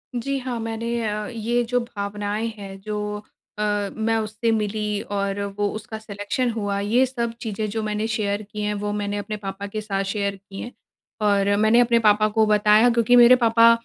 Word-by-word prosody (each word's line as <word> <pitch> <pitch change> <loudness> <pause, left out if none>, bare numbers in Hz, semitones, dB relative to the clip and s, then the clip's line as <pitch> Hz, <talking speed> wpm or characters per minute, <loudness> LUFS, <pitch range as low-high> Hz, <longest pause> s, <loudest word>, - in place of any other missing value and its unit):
जी 275 +3 -1
हाँ, 250 -2 -4
मैंने 225 0 -4 0.2
अ, 210 0 -3
ये 235 +1 -1
जो 245 +1 0
भावनाएँ 210 -1 -3
हैं 195 -1 -8
जो 210 0 -3 0.4
अ, 205 -1 0
मैं 225 0 0
उससे 220 +1 -1
मिली 210 -1 -1
और 200 0 -1 0.2
वो 205 0 +1
उसका 220 0 -6
सिलेक्शन 215 +4 -2
हुआ, 205 -3 -2
ये 225 +6 +3
सब 235 -3 -3
चीज़ें 215 -1 -3
जो 220 +1 -3
मैंने 215 +1 -1
शेयर 210 -2 -1
की 210 -1 -5
हैं 210 0 0
वो 205 0 -2
मैंने 205 0 -2
अपने 210 +1 -4
पापा 200 0 -6
के 215 +2 -4
साथ 195 -2 -2
शेयर 200 -1 -1
की 195 0 -11
हैं। 245 - -6 0.5
और 200 -1 +3
मैंने 220 +3 +4
अपने 235 -1 +4
पापा 215 -1 +4
को 220 0 +3
बताया 210 +2 +5
क्योंकि 235 0 +3
मेरे 240 +1 +8
पापा 230 -1 +5
215 Hz, 190 wpm, -23 LUFS, 205-230 Hz, 0.5 s, मेरे